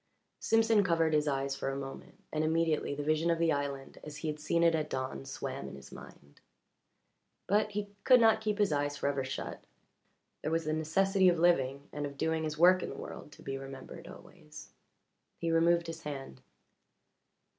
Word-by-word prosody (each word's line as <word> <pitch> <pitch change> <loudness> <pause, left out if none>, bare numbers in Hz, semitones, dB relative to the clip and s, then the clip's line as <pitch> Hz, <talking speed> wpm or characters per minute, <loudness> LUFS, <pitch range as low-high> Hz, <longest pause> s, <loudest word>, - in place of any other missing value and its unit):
Simpson 225 -2 +3
covered 165 -3 +2
his 150 0 +2
eyes 135 -1 -1
for 135 - -3
a 135 - -3
moment, 135 -1 -9
and 155 0 +1
immediately 160 -2 +1
the 145 - -4
vision 155 +3 +1
of 170 - +2
the 165 -1 +2
island 140 -1 -3
as 150 -1 -8
he 155 +2 -3
had 150 0 -4
seen 170 +2 +1
it 170 -1 +5
at 155 -1 -1
dawn 130 - -4
swam - - -5
in - - -9
his 70 -1 -13
mind. 70 0 -14 1.0
But 210 +2 +1
he 205 0 -2 0.2
could 255 -1 +7
not 225 -1 +5
keep 210 -1 -1
his 205 -5 +2
eyes 145 0 0
forever 140 -1 -1
shut 130 +1 -5 0.8
there - - -2
was 165 0 0
the 155 - 0
necessity 190 +5 +3
of 175 - +2
living 140 -5 +2
and 145 0 -2
of 140 0 -11
doing 160 +1 0
his 155 0 -4
work 180 +3 +6
in - - -4
the - - -7
world 150 - -8
to - - -15
be 135 0 -4
remembered 135 -1 -9
always. - - -13 0.7
He 165 -1 -1
removed 170 +1 +3
his 165 0 -7
hand. 135 - -7
155 Hz, 190 wpm, -31 LUFS, 140-170 Hz, 1.0 s, could